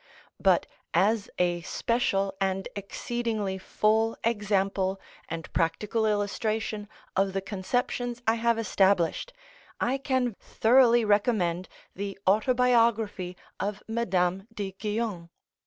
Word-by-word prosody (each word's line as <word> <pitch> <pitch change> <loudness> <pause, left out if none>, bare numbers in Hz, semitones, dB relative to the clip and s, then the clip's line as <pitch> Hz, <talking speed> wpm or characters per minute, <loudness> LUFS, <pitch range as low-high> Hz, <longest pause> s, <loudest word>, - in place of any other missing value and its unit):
But - - +4 0.3
as 210 +1 +2
a 175 -1 +1
special 195 -1 0
and 190 0 0
exceedingly 210 -1 -3
full 220 +3 +1
example 195 -3 0 0.3
and 165 0 -6
practical 210 +6 0
illustration 210 0 -1 0.3
of 195 0 +2
the 195 - 0
conceptions 240 +5 -2
I 225 - +4
have 230 0 +1
established, 195 - +2 0.5
I 265 +3 0
can 260 -3 0
thoroughly 240 0 +4
recommend 205 -4 +1 0.3
the 200 +1 -4
"Autobiography 225 -4 +2 0.2
of 205 0 -3
Madame 195 -4 0
de 205 -4 -4
Guion." 205 -3 -3
210 Hz, 105 wpm, -28 LUFS, 190-230 Hz, 0.5 s, But